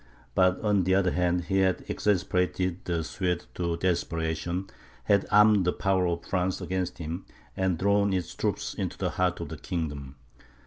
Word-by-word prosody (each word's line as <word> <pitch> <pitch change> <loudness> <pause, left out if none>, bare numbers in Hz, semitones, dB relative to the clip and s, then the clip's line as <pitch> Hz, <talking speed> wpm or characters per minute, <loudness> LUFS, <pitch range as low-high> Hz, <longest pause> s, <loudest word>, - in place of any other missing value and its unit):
But, 90 0 +3
on 105 -4 +2
the 95 +1 +3
other 95 -2 +3
hand, 90 0 +1
he 95 +3 0
had 95 -2 +1
exasperated 90 -2 0
the 85 -2 -1
Swedes 90 -1 -2
to 85 -1 -2
desperation, 85 0 -1 0.4
had 100 -1 +2
armed 105 -1 +6
the 90 - +1
power 95 -2 +1
of 85 -1 -2
France 95 0 0
against 95 -1 -3
him, 85 +3 -5 0.3
and 95 -2 +1
drawn 100 +2 +2
its 90 -3 -2
troops - - -2
into - - -4
the - - -1
heart - - 0
of - - -5
the - - -6
kingdom. 75 -6 -4
90 Hz, 170 wpm, -28 LUFS, 85-95 Hz, 0.4 s, armed